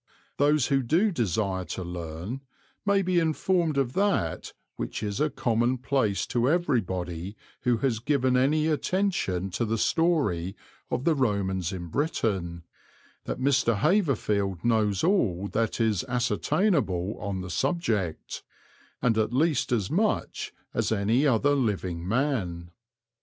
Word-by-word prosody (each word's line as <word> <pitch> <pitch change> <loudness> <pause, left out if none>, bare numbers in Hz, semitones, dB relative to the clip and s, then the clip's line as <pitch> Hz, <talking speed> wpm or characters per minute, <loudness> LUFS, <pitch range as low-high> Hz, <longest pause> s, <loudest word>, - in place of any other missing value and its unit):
Those 145 -1 +3
who 135 -1 +3
do 170 - +2
desire 100 - -1
to 95 - -5
learn 85 +7 -6 0.5
may 200 -1 +3
be 180 -1 +2
informed 165 -1 +1
of 130 -2 0
that 195 - 0 0.2
which - - -4
is 105 +2 -2
a 150 - +3
commonplace 120 -2 0
to 120 +1 +1
everybody 95 - -1 0.2
who 120 -2 +1
has 115 -5 +1
given 130 0 +1
any 145 +5 +3
attention 155 - 0
to 105 - -1
the 115 0 0
story 110 - +1 0.3
of 125 - -2
the 165 - +3
Romans 100 - 0
in 90 -2 -5
Britain, 95 - -1 0.6
that - - -4
Mr. 130 -4 +2
Haverfield 105 - +1
knows 105 -4 +2
all 100 - +2
that 115 +1 -1
is 110 -5 +1
ascertainable 125 - 0
on 100 -2 -3
the 90 0 -6
subject, 115 - -1 0.6
and 115 -3 +3
at 110 0 +1
least 145 +1 +1
as 105 -6 0
much 210 +5 0 0.2
as - - 0
any 110 +7 +2
other 140 +3 +3
living 95 -10 -1
man. 95 -9 -1
115 Hz, 130 wpm, -27 LUFS, 95-145 Hz, 0.6 s, Those